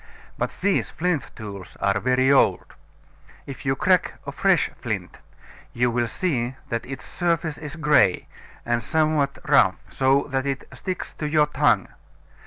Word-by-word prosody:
But - - -1
these 200 0 +1
flint 170 -4 -1
tools 100 -4 -9
are 100 +1 +1
very 130 +4 +2
old. 140 - +3 0.7
If 135 -1 -8
you 135 - +2
crack - - +2
a - - -4
fresh - - +2
flint, - - -4 0.5
you 125 0 +1
will 120 0 0
see 130 -3 -2
that 115 -1 -3
its 135 0 -7
surface 170 -3 -1
is 150 -1 -7
gray, 150 - +3 0.4
and 120 0 0
somewhat 155 0 +1
rough, - - +5 0.2
so 135 +1 +3
that 135 0 -1
it 135 -1 -3
sticks 180 +8 -5
to 150 - -4
your 150 -1 +4
tongue. 145 -9 +2
135 Hz, 150 wpm, -24 LUFS, 120-155 Hz, 0.7 s, rough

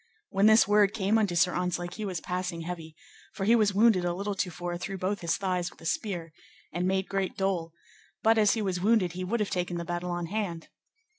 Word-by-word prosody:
When 195 +1 +4
this 220 -2 +6
word 205 0 +4
came 215 +1 +2
unto 200 -5 0
Sir 180 +1 +3
Ontzlake 175 -1 -2
he 215 - -5
was 185 -4 -3
passing 180 -2 -3
heavy, 165 -2 -6 0.4
for 195 - -3
he 230 +3 +5
was 210 -4 +2
wounded 210 -3 +5
a 175 0 -1
little 200 +2 -2
to 195 -1 -1
fore 175 +1 -5
through 195 +1 -4
both 190 +2 -2
his 170 -1 0
thighs 180 -2 -1
with - - -20
a - - -13
spear, 170 -2 -2 0.4
and 180 +1 0
made 190 0 0
great 195 +4 -2
dole; 185 -4 -1 0.5
but 225 0 +5
as 210 0 +4
he 220 - -1
was 185 -3 -1
wounded, 205 -3 +3
he 185 +1 -4
would 215 +5 -1
have 210 - -1
taken 175 -1 -1
the 170 - -4
battle 175 +1 -3
on 175 0 -2
hand. 175 -3 -4
185 Hz, 230 wpm, -28 LUFS, 175-205 Hz, 0.5 s, this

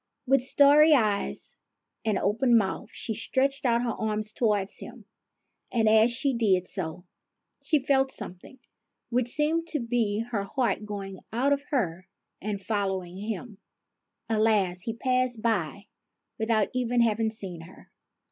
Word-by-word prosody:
With 270 0 +4
staring 290 +4 +6
eyes 210 -6 -1 0.5
and 215 -3 +1
open 235 +5 +3
mouth 195 -4 -1
she 225 - -5
stretched 275 +4 0
out 235 0 +2
her 240 - 0
arms 215 0 -3
towards 210 -4 0
him; - - -11 0.7
and, 225 -3 +2
as 220 +2 +6
she 270 +3 -1
did 195 -6 +2
so, 180 -2 -5 0.6
she 295 -5 0
felt 270 -1 +3
something, 180 +9 -10 0.5
which 245 0 +1
seemed 315 +4 0
to 305 - -2
be 230 -3 0
her 200 -4 -1
heart, 235 -2 -1
go 205 -1 -4 0.3
out 260 +6 +2
of 280 - -1
her, 185 - -1 0.3
and 205 -1 -4
follow 195 -2 -1
him. 200 +4 -6 0.7
Alas! 215 -5 +2
he 225 - -3
passed 255 -2 0
by 200 -4 0 0.6
without 220 -2 +1
even 245 -1 +1
having 225 -1 +2
seen 190 -6 -6
her. 170 +3 -15
220 Hz, 140 wpm, -27 LUFS, 200-255 Hz, 0.7 s, staring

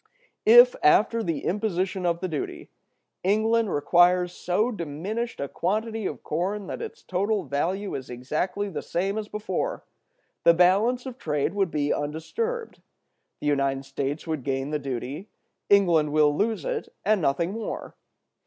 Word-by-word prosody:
If, 240 +3 +9
after 220 +9 +4
the 165 -8 -2
imposition 190 -2 -1
of 170 0 0
the 185 - -1
duty, 155 -5 -5 0.5
England 220 +3 +2
requires 175 +4 +3
so 210 +9 0
diminished 200 +6 -4
a 140 - -2
quantity 215 +6 -2
of - - -7
corn 190 +6 -2
that - - -6
its 455 0 -8
total 200 +2 0
value 175 +8 -2
is 130 - -5
exactly 155 +11 -2
the 155 -7 -4
same 195 +6 -1
as 210 - -5
before, 215 - -3 0.6
the 170 - +6
balance 205 +9 +3
of 255 -1 -7
trade 150 0 -1
would 195 -3 +1
be 145 -2 0
undisturbed; 440 - -3 0.6
the - - -5
United 140 -2 +1
States 140 +2 -3
will 160 -2 -1
gain 135 +1 -3
the 150 - 0
duty, 140 - -5 0.4
England 170 -7 +4
will 150 -1 +4
lose 220 - 0
it, - - -3 0.2
and 215 -3 +3
nothing 165 +5 +1
more. 225 +1 -5
180 Hz, 150 wpm, -26 LUFS, 150-215 Hz, 0.6 s, If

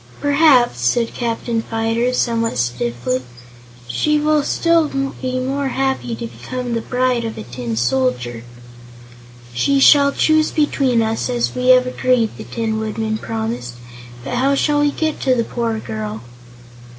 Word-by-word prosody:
"Perhaps," 280 - +4
said 230 - +1
Captain 230 -1 -2
Fyter, 225 +2 -1
somewhat 230 - 0
stiffly, 120 +1 -1 0.7
"she 300 - +1
will 305 0 +2
be 290 - -2
still 335 -2 +2 0.3
more 260 +2 -2
happy 265 - -1
to 115 - -6
become 235 - -5
the 230 - -1
bride 250 0 0
of 225 -1 -5
a - - -6
Tin 120 0 -5
Soldier." 120 -1 -1 1.1
"She 275 - +2
shall 280 0 +6
choose 310 +2 +2
between 270 -6 +1
us, 220 0 -2
as 120 0 -1
we 250 - -2
have 255 0 +6
agreed," 255 -3 +1
the - - -9
Tin 220 -1 -2
Woodman 220 0 -2
promised; 220 - -4 0.5
"but - - -5
how 270 +3 +2
shall 295 +1 +1
we 290 0 +3
get 315 +1 -2
to 260 -1 +2
the 235 - +1
poor 230 -1 -2
girl?" 110 - -5
230 Hz, 150 wpm, -19 LUFS, -, 1.1 s, shall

